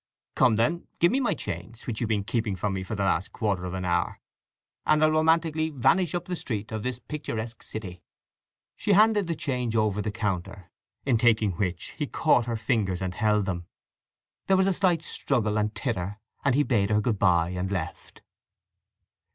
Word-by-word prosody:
"Come 125 -4 +4
then, 155 +11 0
give 170 - +4
me 260 - +2
my 255 - +1
change, 105 +5 -6
which 115 -1 -4
you've 115 - 0
been 105 -2 0
keeping 110 -2 -1
from 95 +2 -2
me 95 - -2
for 95 +4 -4
the 100 - -1
last 95 0 0
quarter 100 -5 -1
of 90 +1 -4
an 95 -1 -3
hour; 85 -1 0 0.6
and 155 0 +3
I'll 155 - +5
romantically 160 0 +2
vanish 165 +5 +2
up 175 - -2
the 180 - -3
street 110 -9 -4
of 110 -1 -3
this 125 +1 -3
picturesque 120 -5 -5
city." 90 -5 -7 0.7
She 205 - +1
handed 210 -1 +5
the 165 - -1
change 125 -6 -2
over 105 -2 +2
the 105 - -2
counter, 95 -3 -3 0.3
in 125 -5 +3
taking 110 -3 +3
which 90 -1 -3
he 150 - -1
caught 130 -7 +2
her 115 -1 -1
fingers 110 -5 0
and 95 -1 -3
held 105 0 +2
them. 85 -3 -4 0.8
There 190 - +4
was 190 - +4
a 195 - +3
slight 175 -4 +2
struggle 110 -6 -1
and 105 0 -1
titter, 105 -5 -3 0.2
and 135 -2 +3
he 145 - +4
bade 105 -7 +1
her 105 0 +3
good 105 -1 0
bye 85 -4 +3
and 90 +1 -3
left. 90 -3 -5
110 Hz, 190 wpm, -27 LUFS, 95-145 Hz, 0.8 s, I'll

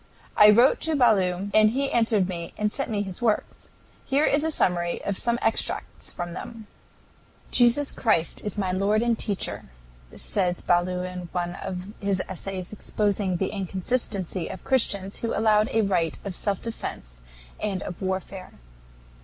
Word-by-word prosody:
I 210 - +8
wrote 235 +6 +5
to 320 -1 0
Ballou, 200 -6 +2
and 215 0 +6
he 275 +4 -1
answered 225 -5 +2
me 170 -2 -6
and 210 0 0
sent 275 +2 0
me 205 -2 -1
his 190 0 -6
works. 225 -3 -1 0.3
Here 285 +3 +2
is 285 - +3
the 320 - 0
summary 175 - +1
of 200 - -1
some 235 +4 0
extracts - - -1
from 175 -1 -5
them: 225 +4 -8 0.9
"Jesus 250 +4 +4
Christ 210 -8 +1
is 210 -1 -4
my 190 -3 0
Lord 200 +4 +2
and 235 -1 +2
teacher," 205 -3 -2 0.5
says 180 -3 -1
Ballou 180 +1 +1
in 180 -1 -6
one 175 -1 -2
of 185 +1 -6
his 200 -2 0
essays 190 0 -5
exposing 205 -3 -1
the 190 - -1
inconsistency 190 -1 -2
of 185 - -8
Christians 200 -7 +1
who 230 - -2
allowed 215 -1 +3
a 225 0 +2
right 175 -5 0
of 195 -2 -4
self 200 0 -1
defense - - -6 0.4
and 200 -3 -2
of 175 - -7
warfare. 190 0 -4
200 Hz, 160 wpm, -25 LUFS, 180-225 Hz, 0.9 s, I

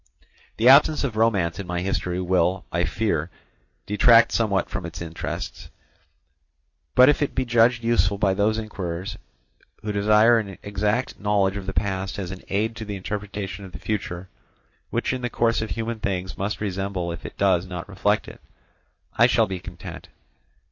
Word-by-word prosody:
The 115 - +3
absence 145 +3 +6
of 125 -6 -2
romance 100 -7 +1
in 100 - -5
my 90 -1 -2
history 90 -1 -2
will, 90 0 +1
I 85 +1 +1
fear, 90 -7 -1 0.6
detract 115 +3 +5
somewhat 100 -5 +1
from - - -5
its 85 0 -7
interest; 85 -1 -6 1.3
but 125 0 +8
if 145 - +3
it 145 - -1
be 130 - 0
judged 120 0 +3
useful 100 -4 +2
by 100 -1 +2
those 105 +3 +1
inquirers 95 -4 -5 0.6
who 105 - -2
desire 105 +3 +5
an 100 -4 -6
exact 105 +5 -1
knowledge 100 -1 +1
of 100 -2 -6
the - - -1
past 95 -1 -2
as 95 -3 -4
an 95 - -8
aid 110 +3 0
to 110 - -6
the 105 -1 -5
interpretation 100 0 -5
of 95 -2 -11
the - - -6
future, 95 -2 -4 0.6
which - - -1
in 130 - -3
the 120 - -2
course 115 -1 +1
of 110 - -4
human 115 0 -3
things 95 -3 -3
must 100 +2 -3
resemble 95 -3 -2
if 85 - -7
it - - -9
does 95 -2 +2
not 90 -2 -6
reflect 100 +2 0
it, - - -11 0.8
I 120 - +8
shall 115 -2 +3
be 95 -3 -5
content. 90 -1 -9
100 Hz, 175 wpm, -24 LUFS, 95-110 Hz, 1.3 s, but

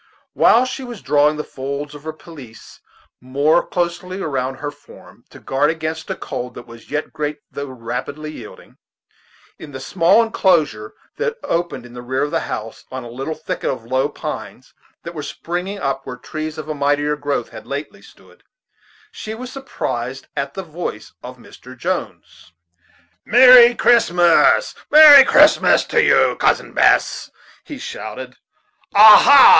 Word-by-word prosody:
While 245 +3 +4
she 260 +1 -6
was 240 -5 -10
drawing 150 +2 +2
the 150 - -4
folds 140 +2 -6
of 145 +1 -13
her 160 - -4
pelisse 145 -8 -14 0.4
more 140 +6 +1
closely 180 +2 -4
around 135 -6 -3
her 145 +2 -6
form, 145 - -18
to - - -15
guard 140 +3 0
against 160 0 -5
a - - -3
cold 125 0 -7
that - - -10
was 115 0 -15
yet 150 +1 -4
great 150 0 -4
though 140 0 -6
rapidly 130 +5 -6
yielding, 120 -8 -13 0.8
in 145 -2 -11
the 130 - -7
small 180 +10 +2
inclosure 155 - 0 0.2
that 465 0 -3
opened 170 -7 -3
in 120 - -14
the 120 - -9
rear 130 +2 -2
of 145 - -3
the - - 0
house 110 +1 -7
on 130 -1 -6
a 120 - -10
little 135 +6 -5
thicket - - -5
of 120 -4 -5
low 130 +4 -1
pines - - -8 0.3
that 170 - -8
were 155 - -6
springing 180 +6 -5
up 135 -6 -3
where 125 - -8
trees 155 +5 -7
of 155 -1 -7
a 155 - -3
mightier 145 +1 0
growth 145 -1 -3
had - - -12
lately - - -7
stood, - - -20 0.7
she 220 +1 -8
was 250 +2 -9
surprised 135 - -5
at 140 0 -4
the 190 - -5
voice 170 +1 -7
of - - -10
Mr. - - -15
Jones. 90 - -6 0.7
"Merry 245 0 +7
Christmas, 175 - +3 0.2
merry 295 -2 +9
Christmas - - +4
to - - +1
you, - - +3
Cousin - - 0
Bess," - - +2 0.3
he 295 - -9
shouted. 470 - -8 0.6
"Ah, 210 +1 +9
ha! 280 -2 +8
150 Hz, 160 wpm, -18 LUFS, 135-185 Hz, 0.8 s, merry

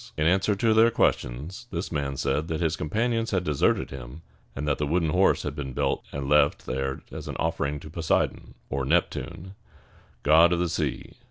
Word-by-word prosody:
In 75 - +1
answer 95 +4 +3
to 110 +3 +2
their 110 +1 +6
questions, 85 - -1
this 85 -3 -4
man 70 -3 -2
said 70 +5 0
that 80 -1 -2
his 80 -1 +1
companions 115 +9 -1
had 95 -3 0
deserted 75 -5 +1
him, 65 +4 -9 0.3
and 75 +2 -4
that 75 - 0
the 75 - 0
wooden 80 0 +1
horse 95 +3 +3
had 75 -1 -4
been 70 -3 -5
built - - 0
and 70 -1 -4
left 75 0 +3
there 65 +1 -3
as - - -7
an - - -5
offering 70 +1 -1
to 75 - -10
Po 85 - -8
sei´don 80 - 0 0.2
(or 70 0 -1
Nep´tune), 85 +4 -1 0.7
god 80 +4 +6
of - - +1
the 90 -1 0
sea. - - -3
80 Hz, 195 wpm, -26 LUFS, 70-90 Hz, 0.7 s, their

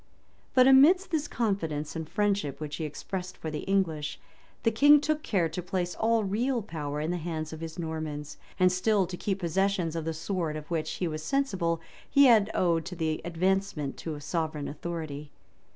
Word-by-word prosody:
But 255 0 +7
amidst 325 +9 +6
this 305 -3 0
confidence 165 - -2
and 160 -1 -5
friendship 200 -9 0
which 150 -1 -5
he 160 - -3
expressed 185 +5 -5
for 160 - -5
the 150 - -3
English, 165 -6 -1 0.4
the 225 - +3
king 290 +6 +7
took 305 +1 0
care 185 - +1
to 180 - -4
place 180 0 -2
all 225 0 +2
real 230 +5 0
power 150 -6 -4
in 155 +3 -1
the 180 - -1
hands 160 -1 -4
of 160 - -7
his 165 -1 -7
Normans, 155 -3 -4 0.2
and 185 0 +5
still 195 +2 +2
to 180 - -6
keep 195 +1 -2
possession 185 -1 0
of 165 -1 -3
the 165 - -1
sword, 165 -1 -2
to 155 - -4
which, 165 -2 -1
he 180 - -2
was 155 -1 -4
sensible, 180 - 0 0.3
he 280 0 +6
had 220 -5 +6
owed 170 -3 +1
his 160 -3 -2
advancement 175 -3 0
to 155 -3 -5
sovereign 155 -1 -2
authority. 150 -2 -5
175 Hz, 185 wpm, -28 LUFS, 155-205 Hz, 0.4 s, But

